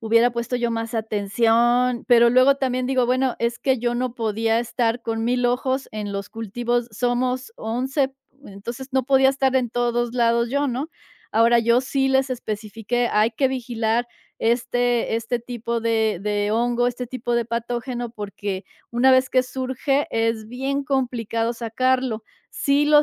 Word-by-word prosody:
hubiera 230 +2 +3
puesto 235 +1 -3
yo 240 -1 0
más 230 0 -3
atención". 230 +3 +1
Pero 235 -1 +6
luego 255 +3 +5
también 255 -2 -1
digo: 255 -1 +1
"Bueno, 255 0 +1
es 235 +1 -1
que 265 -2 +1
yo 240 +1 -1
no 245 0 -2
podía 225 -1 0
estar 240 0 -1
con 225 -1 -3
1000 245 +1 +1
ojos 260 +2 -1
en 210 -1 -4
los 200 0 -4
cultivos". 235 +2 -2
Somos 250 - -1
11 265 +4 -1 0.3
entonces 235 +6 -8
no 265 -1 +1
podía 270 -1 +5
estar 265 -1 +1
en 245 -3 0
todos 240 0 0
lados 235 -1 +2
yo, 285 +1 +1
¿no? 265 +6 -3 0.4
Ahora 230 +2 +5
yo 235 +1 +3
sí 270 +1 0
les 265 0 +2
especifiqué: 225 0 -2
"Hay 215 +2 +3
que 260 +4 +1
vigilar 240 -2 -1 0.3
este 240 0 +1
este 230 +2 -2
tipo 235 -1 -4
de 220 -3 +1
de 205 0 -1
hongo, 240 +2 +1
este 245 0 -3
tipo 245 -1 -3
de 235 -1 0
patógeno, 240 +1 -3
porque 200 -3 -5 0.3
una 245 +2 +4
vez 260 0 +4
que 255 - +4
surge 260 +2 -1
es 225 -1 0
bien 270 +3 -2
complicado 240 -4 -1
sacarlo". 245 0 0 0.3
Sí 285 +1 +1
lo 295 0 +6
240 Hz, 160 wpm, -23 LUFS, 230-255 Hz, 0.4 s, Pero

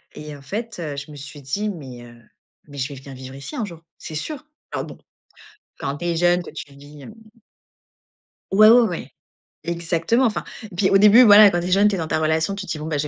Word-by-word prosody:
et 150 -1 -8
en - - -16
fait, 225 - -5 0.2
je 140 +2 -7
me 150 - -11
suis 145 +1 -10
dit: 200 +11 -3
«Mais, 130 -10 -9
heu, 120 0 -14 0.5
mais 145 -1 -12
je 135 +2 -2
vais - - -9
venir 135 0 -11
vivre 130 +1 -10
ici 135 0 -8
un 225 - -2
jour, 170 -4 -11 0.2
c'est 155 - -8
sûr». 290 - -5 0.3
Alors - - -3
bon, - - -11 0.8
quand 140 +1 -3
tu 175 - -6
es 170 -1 0
jeune, 175 +1 +2
que - - -10
tu 140 - -9
vis, 145 0 -14
mmh - - -11 1.4
Ouais, 215 +2 +7
ouais, 240 +2 +8
ouais, 175 - -6 0.5
exactement. 170 +8 0
Enfin 220 - -1 0.2
et 205 -4 -11
puis 190 +2 +2
au 195 - +5
début, 210 +5 +7
voilà, 210 -1 +9
quand 175 - -1
tu 175 - -4
es - - -3
jeune, 200 +2 +5
tu 205 - +1
es - - -3
dans 160 -2 -3
ta - - 0
relation, 160 +4 0
tu 200 -1 -6
te 170 - -6
dis: 155 - -3
«Bon, 155 - -5
je 150 - 0
170 Hz, 245 wpm, -21 LUFS, 145-205 Hz, 1.4 s, voilà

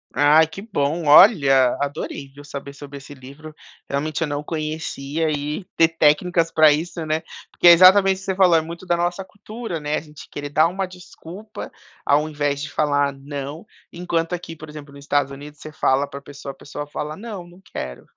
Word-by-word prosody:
Ai 150 +2 +5
que 160 +5 -9
bom, 165 -6 -2
olha, 140 - +6
adorei 140 -1 -4
viu 145 +1 -13
saber 140 -1 -8
sobre 140 0 -10
esse 140 +1 -12
livro, 140 +4 -12 0.4
realmente 150 +3 -2
eu 165 - +1
não 145 0 -3
conhecia 155 -1 -3
e 150 +5 -3
ter 165 - +5
técnicas 165 +2 +2
pra 155 -2 +6
isso, 165 +3 -2
né. 155 +1 -1 0.3
Porque - - +3
é - - +12
exatamente 190 +2 +7
o - - -10
que 195 - -11
você 190 - -1
falou 185 -3 +5
é 160 - +4
muito 170 +3 -9
da 175 - +1
nossa 175 +2 -1
cultura, 210 -2 -7
né, 150 0 -2
a - - -2
gente 150 -1 -14
querer 145 0 -6
dar 155 +3 +4
uma 190 +3 -3
desculpa 185 +3 -10 0.3
ao 150 +2 +2
invés 145 -2 -2
de 145 - -5
falar 145 -1 +1
não, 140 +3 -7 0.3
enquanto 170 -1 -2
aqui 170 -2 -6
por 155 0 -11
exemplo 150 -1 -10
no 140 - -12
Estados 140 0 0
Unidos 145 +2 -11
você 155 - -9
fala 140 -1 +1
pra 140 0 -9
pessoa 140 0 -9
a - - -16
pessoa 145 +1 -7
fala 150 +1 -5
não 200 -3 -8
não 175 +2 -18
quero. 65 -1 -6
155 Hz, 200 wpm, -21 LUFS, 145-175 Hz, 0.4 s, é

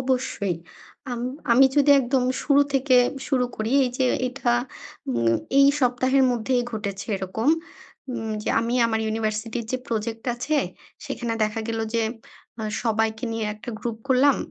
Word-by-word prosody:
অবশ্যই। 250 -8 -1 0.5
আম 240 -1 -3 0.3
আমি 265 +3 +7
যদি 290 0 +5
একদম 255 0 +1 0.2
শুরু 285 -1 +4
থেকে 270 -1 +3 0.3
শুরু 255 -3 +2
করি 220 +2 -2
এইযে 255 +1 0 0.2
এটা 250 -2 0 0.6
উম 115 -1 +2 0.2
এই 275 - +8
সপ্তাহের 255 +1 +3
মধ্যেই 245 +1 0
ঘটেছে 200 -2 -4
এরকম। 190 +7 -2 0.6
উম 225 -2 -4
যে - - -4
আমি 235 +2 -1
আমার 220 -1 0
ইউনিভার্সিটির 220 +1 -2
যে 255 - 0
প্রজেক্ট 225 0 -3
আছে, 290 +6 -1 0.5
সেখানে 235 -2 -3
দেখা 215 +1 -3
গেল 225 0 -2 0.2
যে 230 - +2 0.6
আ - - -2 0.2
সবাইকে 220 0 0
নিয়ে 225 -1 -2
একটা 215 +3 -8
গ্রুপ 230 -2 -4
করলাম। 265 +2 +5
235 Hz, 145 wpm, -24 LUFS, 220-255 Hz, 0.6 s, এই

